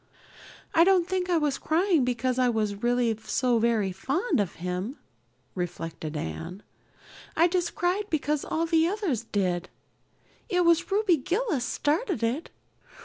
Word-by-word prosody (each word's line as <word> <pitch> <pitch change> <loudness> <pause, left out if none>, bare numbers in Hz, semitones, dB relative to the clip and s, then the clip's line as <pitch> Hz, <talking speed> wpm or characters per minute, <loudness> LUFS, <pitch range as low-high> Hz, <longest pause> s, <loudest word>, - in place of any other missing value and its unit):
"I 330 - +6
don't 365 -2 +4
think 370 -1 -1
I 345 - +3
was 295 -3 0
crying 335 -2 +2
because 250 +1 0
I 250 -1 +4
was 215 -3 -1
really 240 -1 +2
so 245 -3 +1
very 220 -4 +1
fond 280 - -1
of 200 -4 -1
him," 180 - -4 0.6
reflected 165 -3 -5
Anne. 165 - -6 0.7
"I 335 +2 +6
just 355 -1 -1
cried 385 +4 0
because 300 -1 0
all 330 +1 -1
the 325 0 +3
others 355 - -1
did. 185 -4 -1 0.8
It 360 -3 +2
was 340 +2 +3
Ruby 395 -4 +3
Gillis 350 - -1
started 310 - -1
it. 250 +9 -1
275 Hz, 145 wpm, -27 LUFS, 220-350 Hz, 0.8 s, I